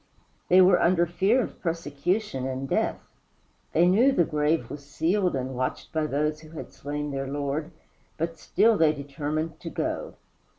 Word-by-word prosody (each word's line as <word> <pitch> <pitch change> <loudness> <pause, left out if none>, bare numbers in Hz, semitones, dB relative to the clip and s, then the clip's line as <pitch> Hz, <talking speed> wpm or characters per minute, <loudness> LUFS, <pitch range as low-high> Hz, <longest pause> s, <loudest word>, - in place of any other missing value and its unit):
They 185 +1 +7
were 180 -1 +5
under 170 0 +4
fear 195 +9 +2
of - - -8
persecution 165 -1 -2
and 135 +1 -4
death; - - 0 0.7
they 170 +2 +4
knew 230 +9 +5
the 180 - +3
grave 150 +1 0
was 145 -1 -8
sealed 170 +5 0
and 130 0 -3
watched 130 0 -3
by 155 -1 0
those 150 +2 -1
who 155 0 -14
had - - -8
slain 145 +2 -4
their 135 0 -3
Lord, 145 +3 -2 0.5
but 165 0 -3
still 215 +3 +3
they 155 -2 +5
determined 150 +2 -4
to - - -6
go. - - -3
155 Hz, 165 wpm, -26 LUFS, 140-175 Hz, 0.7 s, They